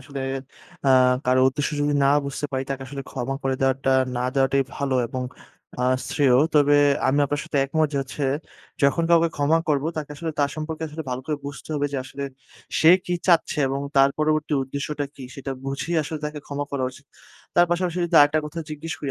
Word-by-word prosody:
আসলে 140 -2 -7 0.7
আ - - +5 0.4
কারো 130 0 +4
উদ্দেশ্য 140 +2 -2
যদি 145 0 +1
না - - +4 0.2
বুঝতে 140 +1 -3
পারি 130 0 -1
তাকে 135 -1 -3
আসলে 135 +1 -6
ক্ষমা 130 +1 -3
করে 135 0 0
দেওয়াটা 135 0 +1 0.3
না 125 - -1
দেওয়াটাই 135 0 +3
ভালো। 140 -2 -1
এবং 130 +2 -4 0.6
আ - - +1 0.3
শ্রেয়। 140 -4 +3 0.2
তবে 145 -1 +5 0.3
আমি 135 +2 +2
আপনার 145 +1 -2
সাথে 165 -4 -1
একমত 155 +3 +1
যে - - -2
হচ্ছে, 135 +2 -5 0.6
যখন 140 +4 +3
কাউকে 170 0 +5
ক্ষমা 150 +3 +3
করব 145 -2 +1
তাকে 150 -2 -4
আসলে 165 +2 -3
তার 140 -1 +2
সম্পর্কে 155 +1 -5
আসলে 155 +2 -6
ভাল 125 - -2
করে 155 -1 -1
বুঝতে 140 +2 -8
হবে 145 -1 0
যে 140 - -1
আসলে 135 +1 -7 0.6
সে 160 - +7
কি 180 - -1
চাচ্ছে? 170 -4 +3
এবং 135 +1 -2 0.2
তার 135 0 +6
পরবর্তী 155 0 +1
উদ্দেশ্যটা 140 +2 -4
কী 135 - -10
সেটা 135 0 -6
বুঝেই 135 +5 -3
আসলে 155 +1 -5
তাকে 150 0 -4
ক্ষমা 145 0 -3
করা 135 -2 0
উচিত। 140 +2 -16 0.5
তার 175 - +6
পাশাপাশি 175 0 0
যদি 170 - -3
আরেকটা 145 +1 +5
কথা 160 +3 -7
জিজ্ঞেস 155 +2 -5
করি 140 - -3
145 Hz, 200 wpm, -24 LUFS, 135-155 Hz, 0.7 s, সে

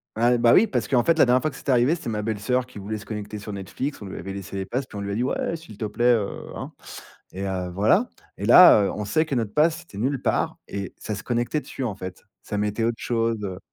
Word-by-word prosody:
Ah, 120 +2 +3
bah 115 0 +5
oui, 215 - +7
parce 125 - -2
qu'en 125 -3 +3
fait, 165 -1 +2
la - - +8
dernière 125 +1 +3
fois 155 - -1
que - - -13
c'était 140 - -2
arrivé, 125 +5 +4
c'était 160 - -6
ma 105 -1 -2
belle-soeur 110 +4 0
qui 125 -5 -11
voulait 110 +2 -4
se 100 - -11
connecter 105 0 -6
sur 105 0 -7
Netflix. 105 - -5
On 100 - -7
lui 95 - -7
avait 95 +3 -6
laissé 100 0 -7
les 95 - -2
pass, 130 +7 -2
puis 105 - -9
on - - -4
lui 100 0 -4
a - - -2
dit: 120 - 0
«Ouais, 165 - -1
s'il 160 -11 -11
te 110 - -3
plaît, 120 +4 +3
heu, 105 -3 0 0.3
hein, - - -6 0.6
et 95 - -6
heu 90 -2 -3
voilà» 110 - +3 0.3
et - - -6
là, 175 - +9
heu, - - 0
on 105 - -4
sait 130 +10 +1
que 145 - -2
notre 110 -3 -1
pass 160 +2 +2
était 135 - -12
nul 130 +4 0
part - - 0
et 100 -2 -5
ça 105 - -4
se 100 - -6
connectait 120 +5 -1
dessus, 135 - -6
en 110 -5 -2
fait. 95 -2 -8 0.2
Ça 105 - -4
mettait 105 +2 -1
autre 115 0 0
chose, 115 -1 0
heu 95 -2 -4
115 Hz, 280 wpm, -24 LUFS, 100-130 Hz, 0.6 s, là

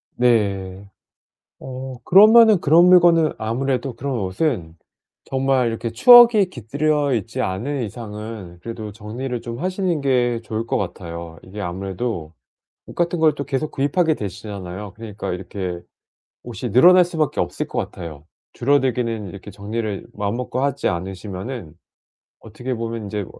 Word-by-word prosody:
네. 100 -5 0 0.7
어 130 0 -7
그러면은 215 +1 +7
그런 165 +4 +6
물건은 175 -3 +5
아무래도 125 +3 -2
그런 130 +2 -3
옷은 95 - -2 0.5
정말 135 -2 +1
이렇게 115 0 -3
추억이 235 - +7
깃들여 145 - 0
있지 105 -5 -3
않은 125 +9 -2
이상은 105 -4 -8
그래도 110 -1 -7
정리를 120 +4 -5
좀 120 0 -7
하시는 185 -2 -1
게 125 -3 +1
좋을 110 0 -4
것 - - -1
같아요. 85 -3 -6
이게 100 +3 -10
아무래도 95 -1 -4 0.5
옷 - - -10
같은 175 0 0
걸 160 -1 +4
또 140 - -4
계속 140 +2 -2
구입하게 155 +4 +1
되시잖아요. 100 -2 -7
그러니까 105 -2 -6
이렇게 90 -1 -5 0.7
옷이 120 0 -5
늘어날 180 - +7
수 175 -1 -8
밖에 155 -2 0
없을 - - -2
것 - - -5
같아요. 75 -4 -6 0.3
줄어들기는 120 -5 0
이렇게 100 +3 -10
정리를 105 +1 -4
마음 105 +1 -2
먹고 125 0 -3
하지 140 0 0
않으시면은 95 - -5 0.7
어떻게 120 +4 -6
보면 115 -1 -4
인제 100 -1 -4
115 Hz, 325 characters per minute, -21 LUFS, 100-140 Hz, 0.7 s, 그러면은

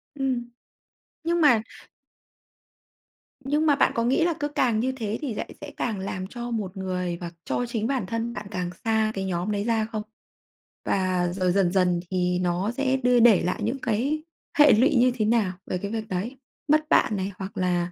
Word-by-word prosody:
Ừm. 255 -3 -1 0.8
Nhưng 340 +1 +1
mà 245 -8 +5 1.8
Nhưng 300 +3 +1
mà 290 - +5
bạn - - +3
có 230 - +1
nghĩ 265 +7 +2
là 345 - +2
cứ 290 - 0
càng 255 -7 +1
như 260 +3 +1
thế 225 -4 -3
thì 270 -6 -3
lại - - -6
sẽ - - -7
càng 220 -5 -2
làm 185 -1 -4
cho 240 +2 -6
một 200 -4 -3
người 180 -2 -2
và 170 -1 -5
cho 245 - -1
chính 230 -2 -2
bản 265 -7 -1
thân 230 +4 -3
bạn 210 -2 -6
càng 180 -3 -2 0.2
xa 220 -1 +2
cái 195 - -2
nhóm 180 +2 -2
đấy 205 -1 -1
ra 225 -1 +1
không? 215 -1 -3 0.8
Và 185 -2 +1
rồi 185 -1 +1
dần 185 -2 +2
dần 180 -2 +3
thì 180 -1 +1
nó 180 +4 0
sẽ 265 +1 0
đưa 250 -1 +3
để 225 -5 +6
lại 180 - -1
những 235 +5 -1
cái 265 +7 0 0.4
hệ 295 - +8
lụy 265 +7 +4
như 250 +1 +5
thế 215 - 0
nào 215 -4 +2
về 185 - -2
cái 200 +3 -5
việc 220 -1 -3
đấy? 210 +9 -3 0.3
Mất 310 +1 +3
bạn 215 -8 +4
này, 190 +1 -2
hoặc 195 +2 -7
là 180 -1 0
220 Hz, 200 wpm, -25 LUFS, 185-250 Hz, 1.8 s, hệ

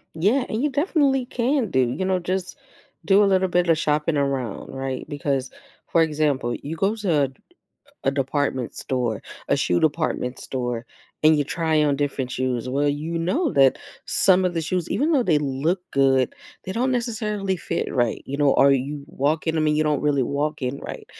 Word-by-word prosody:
Yeah, 215 +11 +2
and 220 - -2
you 295 - +2
definitely 280 -3 +1
can 250 -1 0
do, 130 - +1
you 185 +10 -2
know, 185 -1 +1
just 185 +1 -3 0.5
do 200 +1 +5
a - - +5
little 190 -1 +3
bit 175 -1 +1
of 165 - +4
shopping 150 0 +1
around, 135 -6 -2
right, 135 -1 -4
because 140 -3 -2 0.4
for 165 - +4
example, 150 -6 +1
you 155 +3 -4
go 195 +6 +1
to 155 -10 +1 0.7
a 135 - +3
department 135 -2 -1
store, 120 -5 -2 0.3
a - - +3
shoe 90 - +1
department 150 -5 0
store, 120 -2 -4 0.4
and 155 0 +6
you 145 - +1
try 160 0 +1
on 145 -1 +2
different 140 -2 -2
shoes, 130 -1 -2
well, 140 +3 +1
you 155 +4 -2
know 265 - 0
that 135 -1 +4 0.3
some 190 -1 +4
of 180 - -2
the 165 - -1
shoes, 175 +1 -2
even 305 +5 +1
though 275 -5 +4
they 175 -9 +2
look 150 +6 -1
good, 135 -2 +2 0.3
they 190 - -4
don't 250 +5 0
necessarily 215 -5 -1
fit 165 - -3
right. 120 -3 0
You 140 +1 -5
know, 145 -2 +4
are 140 0 +5
you 140 +2 -2
walking 155 +2 -1
I - - +2
mean, 150 -1 +2
you 155 - +3
don't 150 -2 +1
really 145 -2 +2
walk 145 +3 -2
in 130 +2 -2
right. - - -8
150 Hz, 190 wpm, -23 LUFS, 135-185 Hz, 0.7 s, and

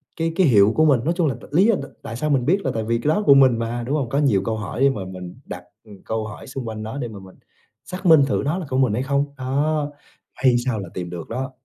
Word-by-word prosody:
cái 165 0 -2
cái 185 -4 +4
hiệu 105 -2 +5
của 155 - +4
mình. 140 -5 +4
Nói 165 +5 +1
chung 170 -4 +2
là 130 - -1
t - - -15
lý 180 +6 +5
do 230 -1 +4
t - - -4 0.2
tại 115 - -7
sao 150 +6 -2
mình 135 -4 +1
biết 190 +7 +2
là - - +1
tại 110 - -2
vì 115 +1 0
cái - - -2
đó 210 +7 +1
của 140 - +8
mình 130 -4 +5
mà, 120 +1 -3
đúng 145 - 0
hông? 135 -6 -1
Có 140 - -1
nhiều 135 -10 +3
câu 110 -1 -1
hỏi 105 +3 -5
để 140 - +6
mà 105 -8 -4
mình 90 0 -9
đặt 90 - -8 0.4
câu 110 -1 -3
hỏi 105 - -10
xung 135 -2 -6
quanh 110 -1 -5
nó 110 +5 -6
để 125 - -3
mà 105 -3 -9
mình 95 -1 -14 0.5
xác 185 +1 -8
minh 160 -4 +7
thử 135 - 0
nó 150 +5 0
là 185 - -5
của 130 - -1
mình 130 -5 +2
hay 125 +4 -1
không, 140 +1 +1
đó. 145 +3 -1 0.5
May 125 -2 +5
sao 120 -5 -1
là 95 -3 -7
tìm 90 -1 -5
được 85 -2 -7
đó. 130 +3 -4
130 Hz, 300 wpm, -22 LUFS, 110-145 Hz, 0.5 s, của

